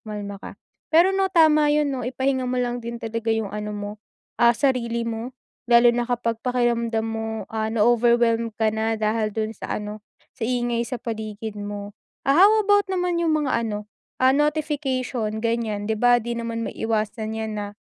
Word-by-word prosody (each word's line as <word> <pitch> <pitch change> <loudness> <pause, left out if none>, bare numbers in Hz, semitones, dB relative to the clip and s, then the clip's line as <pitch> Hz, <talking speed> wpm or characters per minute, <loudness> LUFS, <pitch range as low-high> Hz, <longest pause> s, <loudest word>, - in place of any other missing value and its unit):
kumalma 205 -2 -7
ka. - - -9 0.3
Pero 345 +4 +5
no, 385 0 +1
tama 310 -4 +5
yun 295 -1 +2
no, 260 - -3
ipahinga 260 +1 -1
mo 255 - -1
lang 245 -1 -1
din 235 0 -5
talaga 230 0 -4
yung 220 -3 0
ano 210 0 -4
mo, 205 0 -5 0.5
ah, 235 0 +6
sarili 235 -4 0
mo 230 +3 -5 0.3
lalo 235 0 +6
na 240 - +1
kapag 235 -2 -2
pakiramdam 235 -2 0
mo 225 0 -3 0.3
ah, 220 0 -1
na-overwhelm 230 +1 +3
ka 220 -1 +2
na 220 0 0
dahil 215 0 0
dun 220 +1 -3
sa - - -4
ano, 210 +1 -7 0.3
sa 245 - -10
ingay 240 -1 0
sa 250 - -3
paligid 220 -1 -5
mo. 205 0 -6 0.3
Ah, 275 - +3
how 400 - +8
about 410 -1 +3
naman 360 -2 0
yung 320 -2 +2
mga 260 -4 +1
ano, 210 -2 -4 0.3
ah, 260 0 +5
notification 275 -6 -1
ganyan? 225 -2 -1
Di 220 - 0
ba 245 0 +6
di 235 0 -3
naman 230 -1 -3
maiwasan 220 0 -2
yan 220 -1 -3
na 205 - -3
235 Hz, 180 wpm, -23 LUFS, 220-255 Hz, 0.5 s, how